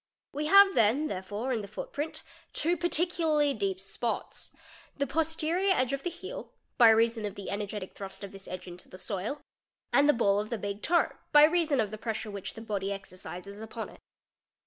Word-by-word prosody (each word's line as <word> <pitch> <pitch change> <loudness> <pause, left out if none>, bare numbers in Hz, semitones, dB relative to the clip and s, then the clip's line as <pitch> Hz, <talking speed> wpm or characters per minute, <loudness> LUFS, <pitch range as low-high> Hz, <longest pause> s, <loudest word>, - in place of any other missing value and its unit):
We 300 +2 -2
have 395 +2 +8
then 240 +7 +3
there 185 -2 -3
Fig. 190 +2 -14
88. 220 +5 -2
re 255 - +1
in - - -3
the 200 - -7
footprint 290 +9 -5 0.3
two 335 +3 +1
particularly 330 -4 +2
deep 385 +3 -2
spots: - - -4 0.5
the 280 - +1
posterior 325 +6 +1
edge 255 +1 +1
of 275 - -2
® 355 - -2
heel, 350 +3 -8 0.3
by 235 -2 +9
reason 225 0 +3
of 205 -1 -4
the 200 - -6
energetic 205 -1 -4
thrust 195 0 -8
of 200 - -6
this 195 -1 -9
edge 185 -1 -6
into 175 0 -11
the 185 - -10
soil, 210 +10 -3 0.5
nd 285 +1 +6
the - - +7
ball 205 -4 +3
of 210 +1 -3
the 235 - -2
big 205 0 -4
toe, 345 0 +2 0.2
by 295 0 +8
reason 315 -3 +3
of 210 -2 +1
the 215 - -6
pressure 220 -1 -3
which 200 -2 -6
the 225 - -8
body 205 -3 -2
Xercises 195 0 -7
upon 220 0 -6
it. - - -15
230 Hz, 205 wpm, -29 LUFS, 200-310 Hz, 0.5 s, by